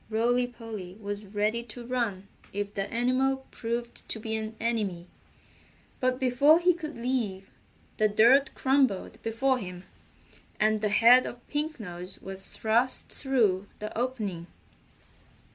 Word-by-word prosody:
Rolly 240 Hz, +3 st, +2 dB
Polly 220 Hz, -6 st, -8 dB
was 205 Hz, 0 st, -5 dB
ready 210 Hz, +3 st, 0 dB
to 235 Hz, +1 st, -10 dB
run 230 Hz, -6 st, -2 dB, 0.2 s
if 205 Hz, 0 st, -3 dB
the 195 Hz, 0 st, -3 dB
animal 260 Hz, +3 st, +1 dB
proved 235 Hz, +1 st, -4 dB
to 220 Hz, -, -2 dB
be 220 Hz, 0 st, -3 dB
an 220 Hz, 0 st, -4 dB
enemy, 210 Hz, -7 st, -1 dB, 0.9 s
but 255 Hz, -1 st, +1 dB
before 280 Hz, +5 st, +5 dB
he 360 Hz, +1 st, +4 dB
could 310 Hz, -5 st, -7 dB
leave 230 Hz, -6 st, -2 dB, 0.5 s
the 215 Hz, -, +4 dB
dirt 235 Hz, +7 st, +4 dB
crumbled 265 Hz, -7 st, +1 dB
before 255 Hz, +4 st, +1 dB
him, 180 Hz, -3 st, -7 dB, 0.8 s
and 215 Hz, 0 st, +2 dB
the 210 Hz, -, +1 dB
head 235 Hz, +4 st, +6 dB
of 240 Hz, 0 st, -10 dB
Pink 300 Hz, 0 st, -2 dB
Nose 180 Hz, -2 st, -4 dB
was 195 Hz, 0 st, -6 dB
thrust 235 Hz, +4 st, +1 dB
through 215 Hz, -8 st, +1 dB
the 215 Hz, 0 st, -6 dB
opening. 215 Hz, -9 st, -2 dB
230 Hz, 135 wpm, -28 LUFS, 205-255 Hz, 0.9 s, head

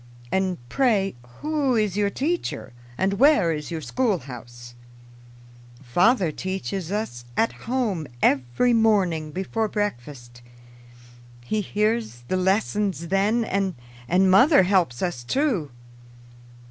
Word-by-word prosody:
"And 190 Hz, -2 st, 0 dB
pray, 215 Hz, -, +1 dB, 0.3 s
who 295 Hz, -4 st, 0 dB
is 210 Hz, -4 st, +1 dB
your 205 Hz, -1 st, +1 dB
teacher, 310 Hz, -, -3 dB, 0.2 s
and 195 Hz, +1 st, 0 dB
where 270 Hz, -, +5 dB
is 150 Hz, -1 st, -5 dB
your 165 Hz, -2 st, -4 dB
schoolhouse?" 125 Hz, -, -3 dB, 1.1 s
"Father 180 Hz, -, +3 dB
teaches 190 Hz, +1 st, -4 dB
us 200 Hz, -, -3 dB
at 225 Hz, -, +2 dB, 0.2 s
home 215 Hz, -, -1 dB
every 135 Hz, -, +2 dB
morning 195 Hz, -9 st, +2 dB
before 195 Hz, +6 st, -2 dB
breakfast. 125 Hz, -, -5 dB, 1.0 s
He 215 Hz, -, -1 dB
hears 210 Hz, -, -1 dB
the 185 Hz, -, +1 dB
lessons 190 Hz, -2 st, 0 dB
then, 210 Hz, +5 st, +2 dB
and 195 Hz, -3 st, -1 dB, 0.6 s
mother 250 Hz, -, +6 dB
helps 180 Hz, -10 st, +1 dB
us 175 Hz, -10 st, -2 dB
too." 220 Hz, -, 0 dB
195 Hz, 110 wpm, -24 LUFS, 155-225 Hz, 1.1 s, mother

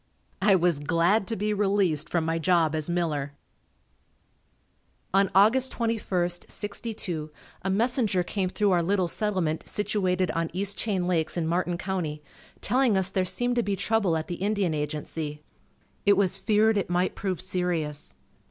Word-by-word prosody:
I 195 Hz, 0 st, +5 dB
was 175 Hz, -4 st, +2 dB
glad 175 Hz, +7 st, +2 dB
to 225 Hz, -, -2 dB
be 210 Hz, +1 st, -1 dB
released 195 Hz, -7 st, +1 dB
from 170 Hz, -2 st, 0 dB
my 165 Hz, +1 st, 0 dB
job 165 Hz, -2 st, +2 dB
as 155 Hz, +1 st, -2 dB
miller. 155 Hz, -5 st, -1 dB, 1.8 s
On 195 Hz, 0 st, +4 dB
Aug. 235 Hz, +7 st, +5 dB
21, 215 Hz, -8 st, -1 dB, 0.2 s
'62 200 Hz, -7 st, -4 dB, 0.3 s
a 190 Hz, -, -2 dB
messenger 215 Hz, -2 st, +1 dB
came 185 Hz, 0 st, -2 dB
through 205 Hz, +1 st, +1 dB
our 175 Hz, -2 st, +3 dB
little 185 Hz, +1 st, +1 dB
settlement 185 Hz, -5 st, -1 dB
situated 185 Hz, -3 st, 0 dB
on 165 Hz, -1 st, -1 dB
East 200 Hz, +2 st, -1 dB
Chain 195 Hz, -5 st, -1 dB
Lakes 170 Hz, -2 st, 0 dB
in 170 Hz, -, 0 dB
Martin 175 Hz, +1 st, 0 dB
County, 170 Hz, -6 st, -3 dB, 0.4 s
telling 250 Hz, -5 st, +2 dB
us 190 Hz, -1 st, +1 dB
there 190 Hz, -1 st, 0 dB
seemed 245 Hz, +6 st, -1 dB
to -, -, +4 dB
be 200 Hz, -3 st, -1 dB
trouble 195 Hz, -3 st, +1 dB
at 160 Hz, -, -4 dB
the 175 Hz, -, -4 dB
Indian 200 Hz, -4 st, 0 dB
Agency. 150 Hz, 0 st, -4 dB, 0.6 s
It 200 Hz, -1 st, +4 dB
was 195 Hz, -1 st, +2 dB
feared 215 Hz, +1 st, +3 dB
it 195 Hz, -, -3 dB
might 180 Hz, +1 st, +1 dB
prove 190 Hz, -4 st, -3 dB
serious. 175 Hz, -5 st, -3 dB
185 Hz, 155 wpm, -26 LUFS, 165-205 Hz, 1.8 s, I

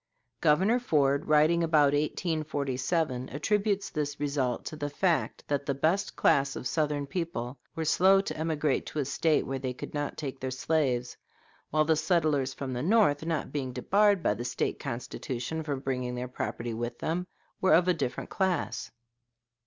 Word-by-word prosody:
Governor 190 Hz, +11 st, +3 dB
Ford, 145 Hz, -, +1 dB
writing 155 Hz, +3 st, +4 dB
about 150 Hz, -3 st, +4 dB
1847, 145 Hz, -3 st, -1 dB
attributes 205 Hz, +6 st, 0 dB
this 145 Hz, -1 st, -3 dB
result 140 Hz, -4 st, -1 dB
to -, -, -5 dB
the 145 Hz, -1 st, -3 dB
fact 170 Hz, +3 st, 0 dB
that 140 Hz, -1 st, -1 dB
the 140 Hz, -, 0 dB
best 165 Hz, +8 st, 0 dB
class 135 Hz, -1 st, +3 dB
of -, -, -6 dB
Southern 150 Hz, -1 st, 0 dB
people 140 Hz, -5 st, -4 dB, 0.2 s
were 160 Hz, -, -2 dB
slow 190 Hz, +5 st, +5 dB
to 195 Hz, -, -3 dB
emigrate 155 Hz, -3 st, 0 dB
to -, -, -7 dB
a 145 Hz, -, +1 dB
State 155 Hz, +3 st, +1 dB
where 135 Hz, 0 st, -3 dB
they 130 Hz, -1 st, -3 dB
could -, -, -8 dB
not 145 Hz, -1 st, -3 dB
take 135 Hz, -3 st, -5 dB
their 130 Hz, -, -3 dB
slaves; 130 Hz, -2 st, 0 dB, 0.5 s
while 155 Hz, 0 st, +2 dB
the 160 Hz, +1 st, +3 dB
settlers 155 Hz, -4 st, +1 dB
from 130 Hz, -1 st, -5 dB
the 125 Hz, -, -2 dB
North, 175 Hz, -, +3 dB
not 165 Hz, -2 st, -2 dB
being 130 Hz, -3 st, -3 dB
debarred 200 Hz, -, +3 dB
by -, -, +3 dB
the 115 Hz, +4 st, -5 dB
State 120 Hz, 0 st, -2 dB
Constitution 125 Hz, +5 st, -4 dB
from 145 Hz, -4 st, -3 dB
bringing 125 Hz, -2 st, -2 dB
their 125 Hz, +1 st, -3 dB
property 120 Hz, -1 st, -4 dB
with 120 Hz, +1 st, -4 dB
them, 175 Hz, +3 st, -2 dB, 0.3 s
were 190 Hz, -, +5 dB
of 175 Hz, +2 st, +3 dB
a 180 Hz, -, +5 dB
different 145 Hz, -7 st, -4 dB
class. 190 Hz, -3 st, -1 dB
150 Hz, 170 wpm, -29 LUFS, 130-165 Hz, 0.5 s, slow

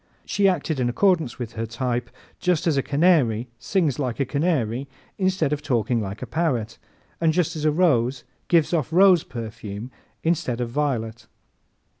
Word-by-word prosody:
She 200 Hz, -1 st, +2 dB
acted 160 Hz, -5 st, 0 dB
in 120 Hz, -1 st, +1 dB
accordance 165 Hz, -, +2 dB
with 120 Hz, -3 st, -6 dB
her 115 Hz, 0 st, -3 dB
type 120 Hz, +1 st, -2 dB, 0.3 s
just 180 Hz, -1 st, +1 dB
as 165 Hz, -4 st, +2 dB
a 135 Hz, -, +2 dB
canary 140 Hz, -7 st, +2 dB
sings 160 Hz, -7 st, 0 dB
like 125 Hz, -3 st, -2 dB
a 135 Hz, -, +2 dB
canary 140 Hz, -4 st, 0 dB, 0.3 s
instead 185 Hz, -6 st, +1 dB
of 150 Hz, -, -2 dB
talking 120 Hz, -5 st, 0 dB
like 100 Hz, +3 st, -5 dB
a -, -, -3 dB
parrot, 125 Hz, -6 st, -1 dB, 0.4 s
and 165 Hz, -1 st, +4 dB
just 170 Hz, -1 st, 0 dB
as 155 Hz, -1 st, -3 dB
a 155 Hz, -, +4 dB
rose 135 Hz, -7 st, +2 dB, 0.2 s
gives 170 Hz, -1 st, +3 dB
off 155 Hz, -3 st, 0 dB
rose 180 Hz, -1 st, +6 dB
perfume 110 Hz, 0 st, -7 dB, 0.3 s
instead 160 Hz, -7 st, 0 dB
of 120 Hz, -1 st, -3 dB
violet. 120 Hz, -5 st, -2 dB
140 Hz, 165 wpm, -24 LUFS, 120-165 Hz, 0.4 s, rose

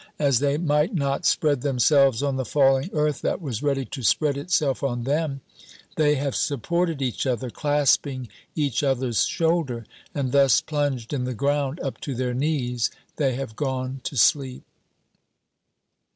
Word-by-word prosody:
As 140 Hz, -5 st, +2 dB
they 145 Hz, 0 st, +1 dB
might 155 Hz, +4 st, +1 dB
not 140 Hz, +1 st, 0 dB
spread 145 Hz, -5 st, +2 dB
themselves 135 Hz, -1 st, +3 dB
on 140 Hz, -2 st, 0 dB
the 130 Hz, -, -1 dB
falling 135 Hz, +3 st, +2 dB
earth 150 Hz, -2 st, 0 dB
that -, -, -1 dB
was 135 Hz, -, -4 dB
ready 140 Hz, -2 st, 0 dB
to 130 Hz, +3 st, -7 dB
spread 140 Hz, -, +2 dB
itself 140 Hz, -2 st, 0 dB
on 120 Hz, -3 st, -2 dB
them, 140 Hz, +1 st, -1 dB, 0.5 s
they 150 Hz, -1 st, +3 dB
have 140 Hz, -1 st, -2 dB
supported 165 Hz, +2 st, -1 dB
each 130 Hz, +1 st, -2 dB
other, 125 Hz, -1 st, -2 dB
clasping 145 Hz, -3 st, +1 dB, 0.3 s
each 140 Hz, -6 st, 0 dB
other's 130 Hz, -4 st, +1 dB
shoulder; 160 Hz, -9 st, 0 dB, 0.3 s
and 135 Hz, -3 st, -1 dB
thus 140 Hz, -3 st, +5 dB
plunged 145 Hz, -5 st, -2 dB
in 130 Hz, -3 st, -1 dB
the 130 Hz, -1 st, -3 dB
ground 140 Hz, +4 st, 0 dB
up 135 Hz, -, -5 dB
to 140 Hz, -, -4 dB
their 125 Hz, 0 st, -1 dB
knees, 125 Hz, -4 st, 0 dB, 0.3 s
they 135 Hz, -5 st, +1 dB
have 130 Hz, -4 st, -5 dB
gone 130 Hz, -1 st, -3 dB
to 140 Hz, -, -4 dB
sleep. 130 Hz, +2 st, +2 dB
140 Hz, 155 wpm, -24 LUFS, 130-150 Hz, 0.5 s, thus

